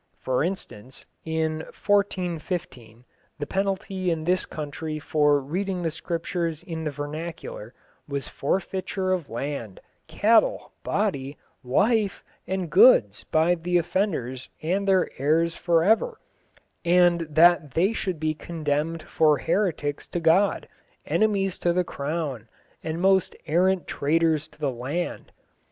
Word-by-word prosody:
For 130 +1 0
instance, 135 - -6 0.2
in 160 -1 -1 0.2
1415 170 - -2 0.3
the 145 - -3
penalty 190 0 -1
in 165 -2 -1
this 180 +2 +1
country 155 +1 -5
for 150 -1 +2
reading 180 +6 -3
the 165 - 0
Scriptures 165 0 -3
in 165 -3 -5
the - - 0
vernacular 160 - -6 0.3
was 140 -1 -3
forfeiture 185 +4 -2
of 180 -6 -1
land, 120 -4 -5 0.3
cattle, 230 - +2
body, 140 -10 -1 0.3
life, 205 - +1 0.2
and 190 -2 -2
goods - - +6
by 160 +3 +3
the 175 +1 0
offenders 160 - -1
and 190 +5 0
their 190 -2 +4
heirs 165 +4 +2
for 170 -2 +2
ever, 335 - +2 0.6
and 175 0 +4
that 160 -2 +4
they 190 +7 +3
should 185 -7 -3
be 155 0 0
condemned 155 0 -2
for 155 -2 +3
heretics 160 -3 -1
to 175 - -3
God, 170 +5 +3 0.4
enemies 200 -4 +1
to 175 - +1
the 180 +1 +2
Crown, 140 -7 -4 0.3
and 160 +1 -3
most 190 0 +3
errant 180 +3 +2
traitors 155 +1 +1
to 150 -1 -23
the 145 -3 -1
land. 135 +9 -4
165 Hz, 125 wpm, -25 LUFS, 150-185 Hz, 0.6 s, goods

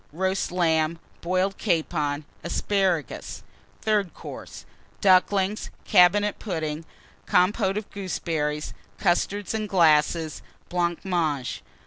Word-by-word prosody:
Roast 190 +3 -1
Lamb. 165 -2 +2 0.2
Boiled 185 +3 0
Capon. 155 -5 0 0.2
Asparagus. 180 - -1 0.4
THIRD 210 -4 +1
COURSE. - - -9 0.3
Ducklings. 195 +1 +3 0.2
Cabinet 205 +2 +4
Pudding. 160 -5 -3 0.4
Compôte 195 +2 +2
of 210 -1 -4
Gooseberries. 160 -6 -2 0.2
Custards 195 +2 0
in 215 -1 -2
Glasses. 160 -3 +3 0.3
Blancmange. 170 -5 -1
180 Hz, 85 wpm, -25 LUFS, 160-195 Hz, 0.4 s, Cabinet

